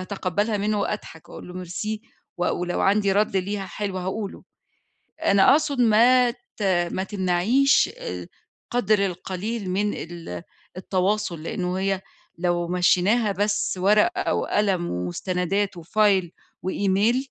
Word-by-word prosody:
هاتقبَلها 200 +3 -1
منه 205 +1 0
وأضحك 180 -6 -5
وأقول - - -10
له 180 0 -7
merci، 210 +5 -4 0.4
و 175 - 0
ولو 175 0 -2
عندي 200 0 +3
رد 205 -1 +1
ليها 195 +1 -2
حلو 195 0 -4
هاقوله. 195 +3 -4 0.8
أنا 200 +4 +5
أقصد 285 -3 +2
ما 240 +2 +5
ت 240 -3 -11 0.3
ما 190 - -2
تمنعيش 195 +8 +2
آآ - - -6 0.4
قَدْر 215 -4 +2
القليل 190 +3 -4
من 205 +2 0
ال 165 - -7 0.3
التواصل، 185 -3 -1
لإنه 180 -2 -2
هي 195 -1 0 0.4
لو 175 -1 0
مشّيناها 185 +5 +3
بس 205 0 0
ورقة 340 - +3
وقلم 190 -4 0
ومستندات 180 - -2
وfile 195 +1 +2 0.4
وemail، 200 +5 +2
195 Hz, 120 wpm, -24 LUFS, 180-215 Hz, 0.8 s, أنا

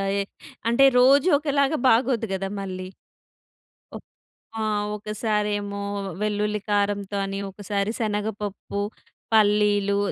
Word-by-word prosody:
ఆహ్, 195 0 0 0.5
అంటే 275 +3 +5 0.2
రోజు 275 +7 +5
ఒకలాగా 285 0 +1
బాగోదు 230 0 +2
కదా 195 0 -2
మళ్ళీ. 185 -1 -5 1.1
ఒ - - -4 0.6
ఆ! - - -1 0.3
ఒకసారేమో 210 -1 -2 0.4
వెల్లుల్లి 210 0 0
కారంతోని, 200 -1 -1
ఒకసారి 200 +1 -2
శనగపప్పు, 210 -2 -3 0.5
పల్లీలు, 205 -1 +3
210 Hz, 90 wpm, -24 LUFS, 200-220 Hz, 1.1 s, అంటే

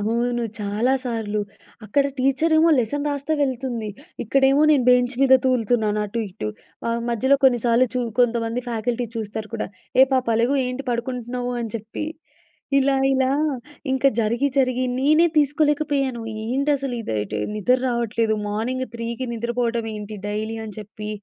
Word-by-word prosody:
అవును. 235 +3 0 0.2
చాలా 210 +5 0
సార్లు 220 -4 -2 0.4
అక్కడ 275 +7 +2
టీచరేమో 315 +5 +3
లెసన్ 285 +5 -1
రాస్తా 285 +2 -2
వెళ్తుంది. 255 -4 -2 0.4
ఇక్కడేమో 270 +4 +3
నేను 275 -5 +4
బెంచ్ 250 0 +3
మీద 265 -1 +7
తూలుతున్నాను 225 -4 +1
అటు 220 +3 -3
ఇటు. 110 -12 -5 0.6
మధ్యలో 260 +4 +3
కొన్ని 250 -2 +5
సార్లు 245 +1 +2 0.2
కొంతమంది 235 0 +1
ఫ్యాకల్టీ 235 +1 -2
చూస్తారు 215 0 -4
కూడా. 225 - -2 0.3
"ఏ - - +10
పాపలెగు, 240 0 +2
ఏంటి 255 +2 -4
పడుకుంటున్నావు?" 245 0 -3
అని 225 - -4
చెప్పి 220 +7 -6 0.7
ఇలా 275 0 +3 0.2
ఇలా 260 -1 +2 0.6
ఇంకా 265 +1 +3
జరిగి, 235 +5 +1
జరిగి 255 -1 +2
నేనే 305 +5 +4
తీసుకోలేకపోయాను. 290 -4 +1 0.3
ఏంటి 275 +5 0
అసలు 270 -2 -4
ఇది? 105 - -3 0.2
నిద్ర 250 +5 +2
రావట్లేదు, 230 -2 0
మార్నింగ్ 240 +5 -2
3కి 235 +2 -4
నిద్రపోవడం 235 0 -1
ఏంటి 210 0 -7
డైలీ 215 +2 -3
అని 210 - -8
చెప్పి 210 0 -8
245 Hz, 135 wpm, -22 LUFS, 225-265 Hz, 0.7 s, ఏ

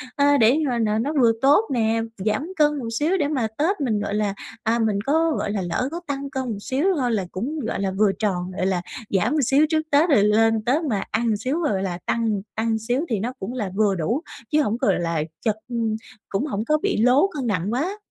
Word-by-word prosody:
ơ, 285 0 +4
để 235 +4 +5
mà 245 -2 0
nà 215 -1 +1
nó 285 +6 -1
vừa 230 -1 +6
tốt 285 +10 +5
nè, 225 -1 +1 0.2
giảm 240 +8 0
cân 295 -1 +3
một 235 - -5
xíu 335 +6 +2
để 295 -5 +1
mà 260 -7 0
Tết 320 +3 0
mình, 220 -6 0
gọi 205 - -3
là, 210 -1 0 0.3
à, 230 +1 +1
mình 215 -3 +1
có, 320 +3 +2
gọi 205 - -2
là, 205 -2 -1
lỡ 185 +8 -1
có 340 - -4
tăng 280 -1 -3
cân 265 -2 -3
một 210 - -4
xíu 270 - -1
thôi 245 -2 +1
là 205 -4 0
cũng, 275 +11 -3
gọi 225 -5 -3
là, 195 - 0
vừa 210 -1 +4
tròn, 185 -4 -1
gọi 185 - 0
là, 185 -2 0 0.3
giảm 190 +5 +1
một 310 - +1
xíu 275 +5 +4
trước 315 -1 +2
Tết, 300 +4 +4
rồi 220 -9 +5
lên 225 0 +3
Tết 280 +7 +2
mà 215 -10 -1
ăn 225 -2 +1
xíu, 270 +9 -2
gọi 200 - 0
là, 180 -2 -3
tăng 220 -4 0
tăng 220 0 0
xíu 245 +5 -1
thì 220 - 0
nó 240 +5 -3
cũng 190 +6 -5
là 210 -7 -3
vừa 205 -2 +2
đủ, 225 - -1 0.3
chứ 305 - +4
hổng, 230 -4 0
gọi 195 -6 +1
là, 165 -2 -1 0.2
chật 215 -2 +2
ừ, 240 - -5 0.5
cũng 200 +8 -1
hổng 220 -6 -3
có 305 0 +3
bị 405 -1 0
lố 250 - +4
cân 265 -4 -2
nặng 200 0 -1
quá. 345 - -1
230 Hz, 245 wpm, -23 LUFS, 210-285 Hz, 0.5 s, vừa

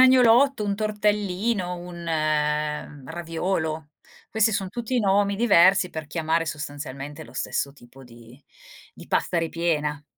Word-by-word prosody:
agnolotto, 255 -1 +6
un 200 -1 0
tortellino, 210 -2 0
un 175 -1 -9 1.0
raviolo. 160 -2 -3 0.4
Questi 220 0 +2
son 195 -1 -1
tutti 240 +3 -2
nomi 200 0 +2
diversi 195 -4 +5
per 160 -3 -6
chiamare 165 +1 0
sostanzialmente 145 -1 -6
lo - - -15
stesso 140 - -2
tipo 135 0 -16
di 120 +1 -15 0.5
di - - -13
pasta 175 - 0
ripiena. 160 -3 -1
175 Hz, 120 wpm, -25 LUFS, 155-210 Hz, 1.0 s, agnolotto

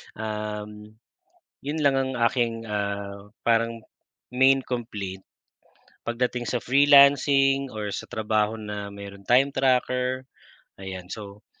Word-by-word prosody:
Uhm, 105 0 -6 0.7
yun 145 +3 -3
lang 140 -3 +3
ang 135 0 0
aking, 115 -2 -1
ah, 100 -1 -4 0.2
parang 115 0 +2 0.6
main 135 +1 +5
complaint, 105 -6 -5 0.8
pagdating 120 +1 -1
sa 120 +1 -2
freelancing, 140 0 +5
or 105 -1 -4
sa - - -5
trabaho 110 0 0
na 105 -1 -6
merong 100 -1 -10
time 130 +5 +4
tracker, 130 -1 +1 0.6
ayan, 95 -1 -7
so, 100 +1 -9
115 Hz, 110 wpm, -25 LUFS, 105-130 Hz, 0.8 s, main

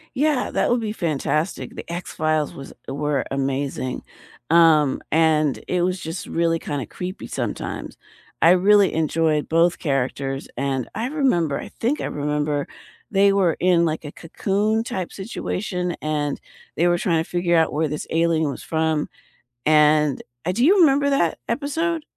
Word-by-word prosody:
Yeah, 290 0 +1
that - - +1
would 240 0 +2
be 215 -2 -3
fantastic. 160 -2 -2
The - - -8
X-Files 155 -3 -1
was 135 - -10 0.2
were 145 0 -1
amazing, 135 -1 -2 0.5
um, 160 -4 +5
and 155 -3 +2
it 180 -1 +1
was 180 +1 0
just 160 +1 -5
really 165 0 +1
kinda 145 -6 -4
creepy 185 - -6
sometimes. - - -4 0.5
I 165 - +7
really 195 +2 +5
enjoyed 155 -1 +1
both 165 +2 +3
characters, 135 -1 -2
and 135 -1 -2
I 225 - -2
remember- 250 - +1
I - - -8
think 255 +6 -2
I - - -2
remember- 150 0 -1 0.5
they 200 0 +5
were 185 -5 +2
in, 175 -1 +4
like, 160 -1 -2
a 145 - -6
Cocoon 205 +6 -1
type 185 -6 -4
situation, 185 -3 -3
and 150 -2 -2 0.4
they 175 +2 +3
were 175 0 +2
trying 165 -2 +1
to - - -13
figure 175 -1 +1
out 160 -1 +3
where 155 +1 0
this 150 +1 -5
alien 165 -2 +2
was - - -7
from, 160 -1 0 0.6
and 150 -2 +4 0.2
uh, 180 - +1
do 235 +7 +2
you 385 +5 +5
remember 280 -2 +4
that 225 - +1
episode? 310 +6 -1
165 Hz, 155 wpm, -22 LUFS, 150-195 Hz, 0.6 s, I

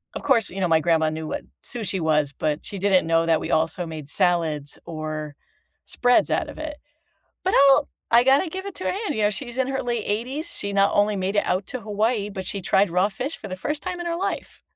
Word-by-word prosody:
of - - -5
course, 240 -7 +3
you 190 - -7
know, 180 - +2
my 160 -1 +5
grandma 160 -2 +2
knew 155 0 -5
what - - -4 0.2
sushi 205 -5 -1
was, 150 -3 +1
but 150 +2 -2
she 200 - -4
didn't 190 -3 +3
know 165 0 +3
that 165 -1 +3
we - - -4
also 165 +2 +1
made 155 -3 -7
salads 160 -4 +1
or 155 -2 -5 0.5
spreads 245 0 +3
out - - 0
of - - -10
it. 310 -1 -5 0.7
But 375 - +1 0.2
I'll 285 +2 +4 0.2
I 235 +1 +6
gotta 275 +6 +4
give 380 +4 -6
it 400 - -6
to 370 - -5
her - - +1
hand, 400 -5 -3
you 220 - -2
know, - - +5
she's 240 +4 -4
in 260 - +2
her 270 0 -2
late 235 -3 -2
80s, 260 +10 -2
she 200 - -3
not 200 0 +3
only 205 +1 +3
made 190 +2 -1
it 205 - +3
out 190 +2 0
to 255 - -4
Hawaii, 210 0 -1
but 190 -2 -6
she 200 - -3
tried 195 +3 +3
raw 185 +4 +2
fish 265 +10 -4
for - - -9
the 185 - -4
1st 295 +10 -3
time 365 -1 -4
in 345 - -4
her 335 - -1
life. 390 +3 -4
200 Hz, 245 wpm, -24 LUFS, 165-255 Hz, 0.7 s, I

